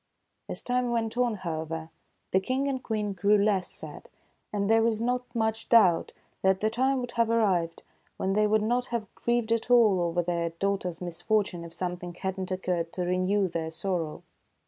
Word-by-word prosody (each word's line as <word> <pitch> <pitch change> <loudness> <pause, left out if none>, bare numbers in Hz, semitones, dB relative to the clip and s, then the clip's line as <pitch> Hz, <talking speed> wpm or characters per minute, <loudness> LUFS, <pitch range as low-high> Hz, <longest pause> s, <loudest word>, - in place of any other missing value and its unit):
As - - -5
time 250 0 0
went 230 -1 -1
on, 245 -2 +1
however, 160 -3 -4 0.4
the 190 - +4
King 260 +8 -1
and 265 -2 -1
Queen 210 -4 -2
grew 200 +3 +3
less 200 -3 +2
sad, - - -7 0.4
and 200 -1 -1
there 225 +1 +4
is 220 -2 0
not 250 +2 0
much 220 0 -1
doubt 190 -8 +5 0.3
that 190 0 +3
the 215 +2 +1
time 260 +3 +1
would 245 -1 -5
have 230 -1 +1
ar 230 - +3
rived 180 -7 +1 0.3
when 190 0 0
they 210 +1 +3
would 215 0 +2
not 245 +3 0
have 230 -5 -4
grieved 235 -1 0
at 230 +1 0
all 220 -7 +5
over 175 0 0
their 170 -1 -1
daugh 200 0 +1
ter's 180 -2 -5
misfortune 180 +1 -1
if 170 - -9
something 180 0 -4
had 190 +1 -3
not 185 - -3
occurred 180 -3 -2
to 180 - -2
renew 185 +2 +1
their 165 -2 -3
sorrow. 165 -2 -3
200 Hz, 190 wpm, -28 LUFS, 180-230 Hz, 0.4 s, doubt